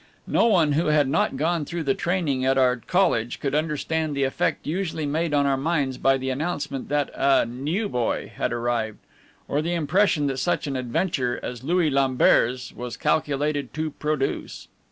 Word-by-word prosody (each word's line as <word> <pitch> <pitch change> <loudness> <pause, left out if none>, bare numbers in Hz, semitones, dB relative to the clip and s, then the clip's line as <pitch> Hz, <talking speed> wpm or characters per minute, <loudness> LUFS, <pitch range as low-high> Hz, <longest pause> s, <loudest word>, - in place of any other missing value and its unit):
No 230 - +3
one 170 -9 +3
who 155 +3 +1
had 150 -2 +3
not 135 0 +1
gone 165 +2 0
through 170 +3 -4
the 135 -2 +2
training 165 -8 -1
at 135 +1 +2
our 130 -1 +4
college 120 - 0
could 140 - -2
understand 155 0 -1
the 140 - +1
effect 135 - -1
usually 160 -1 -2
made 160 +3 -1
on 145 -1 +2
our 135 -1 +2
minds 140 -3 -1
by 135 0 +3
the 130 0 -3
announcement 145 -1 -3
that 145 -1 0
a 135 -2 +3
"new 145 - -2
boy" 125 - -2
had - - -1
arrived, 120 -2 -1 0.5
or 145 - 0
the 170 +2 -1
impression 165 -1 +2
that 135 -2 -1
such 175 - 0
an 140 -2 -3
adventure 125 0 -1
as 125 -1 -6
Louis 165 +1 +2
Lambert's 130 -2 +2
was 120 -1 -6
calculated 145 -2 0
to 155 0 -2
produce. 150 -2 -3
145 Hz, 175 wpm, -24 LUFS, 130-160 Hz, 0.5 s, our